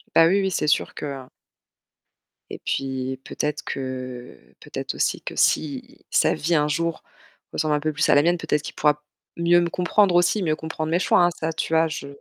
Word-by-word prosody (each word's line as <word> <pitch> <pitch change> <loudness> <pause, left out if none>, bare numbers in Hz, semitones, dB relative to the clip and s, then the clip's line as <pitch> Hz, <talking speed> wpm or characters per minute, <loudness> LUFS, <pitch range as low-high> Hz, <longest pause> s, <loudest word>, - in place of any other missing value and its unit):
Bah 165 - +8
oui, 195 +3 +3
oui, 190 -1 0
c'est 150 - -1
sûr - - +1
que, - - -6
heu 140 -2 -5 1.3
Et - - -7
puis, 130 -1 -2
peut-être 150 0 -3
que 130 - -6 0.2
peut-être - - -6
aussi - - 0
que - - -7
si 140 -4 0
sa - - +3
vie 165 +2 0
un 150 0 +3
jour 165 +2 -2 0.5
ressemble 155 -1 0
un 150 - 0
peu 155 +1 -2
plus 150 - +1
à - - +6
la 145 - +6
mienne, 175 +1 +2
peut-être 155 -2 -1
qu'il - - -8
pourra 150 0 +1 0.3
mieux 170 +1 +4
me 170 - 0
comprendre, 180 +1 +2
aussi, 175 +3 +3
mieux 155 -2 +1
comprendre 160 0 -4
mes 175 - +2
choix, 180 - +4
hein. 175 - +3
Ça, 160 0 -2
tu 160 - -3
vois, 160 0 +4
je 145 -2 -6
155 Hz, 205 wpm, -23 LUFS, 145-170 Hz, 1.3 s, Bah